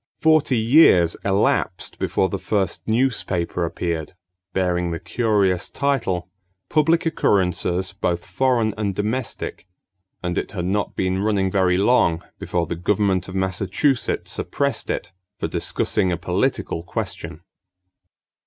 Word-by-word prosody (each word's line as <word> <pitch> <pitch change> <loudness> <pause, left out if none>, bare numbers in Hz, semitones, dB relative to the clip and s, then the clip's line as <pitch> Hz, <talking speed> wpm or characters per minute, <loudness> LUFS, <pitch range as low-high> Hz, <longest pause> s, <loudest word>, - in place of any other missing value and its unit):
Forty 155 -5 +3
years 110 - +5
elapsed 100 0 0
before 95 - +1
the 100 - -4
first 95 -4 -1
newspaper 110 -8 0
appeared, 85 -1 -3 0.4
bearing 90 -2 0
the 85 0 -3
curious 100 -6 +1
title, 115 -11 -1 0.4
Public 165 +3 +3
Occurrences 95 - +1
Both 90 -3 -2
Foreign 115 +2 +1
and 100 -3 -1
Domestic, 110 -2 -3 0.6
and 90 -1 0
it - - -6
had 90 -4 -3
not 100 +3 -1
been 95 0 0
running 100 -3 +1
very 90 -2 +3
long 95 -6 +3 0.2
before 85 -1 -1
the 85 - -4
government 95 +1 +1
of 95 - -8
Massachusetts 95 +8 0
suppressed - - -2
it - - -3 0.3
for - - -2
discussing 95 -4 0
a 85 - 0
political 90 +1 -1
question. 85 -1 -5
95 Hz, 125 wpm, -22 LUFS, 90-110 Hz, 0.6 s, years